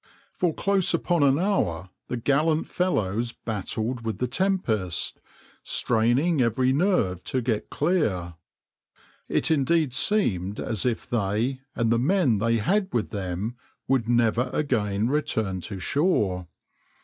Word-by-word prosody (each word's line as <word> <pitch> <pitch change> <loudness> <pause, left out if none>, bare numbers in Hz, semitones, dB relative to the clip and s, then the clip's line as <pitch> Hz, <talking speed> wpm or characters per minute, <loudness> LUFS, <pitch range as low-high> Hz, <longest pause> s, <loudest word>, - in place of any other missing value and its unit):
For 175 -2 0
close 195 +1 +1
upon 170 -1 0
an 140 -1 +4
hour 95 - -1 0.2
the 125 - -3
gallant 150 +6 +1
fellows 115 - -1
battled 115 +3 -3
with 110 -4 -3
the 125 - -1
tempest, 125 - -1 0.4
straining 125 +7 +2
every 125 +2 +2
nerve 135 - +1
to 130 - -1
get 115 -3 -2
clear. 110 - 0 1.0
It - - +1
indeed 155 -1 +2
seemed 105 - +1
as 110 +2 -1
if 115 -2 -2
they 120 +3 -1
and 115 -1 +1
the 115 - +3
men 140 - +2
they 115 +2 +2
had 190 - 0
with 115 -3 -1
them 100 +3 -4 0.3
would 125 -4 +1
never 120 +1 +2
again 105 -7 0
return 110 -9 -1
to 100 +3 -6
shore. 95 - 0
120 Hz, 130 wpm, -25 LUFS, 105-155 Hz, 1.0 s, an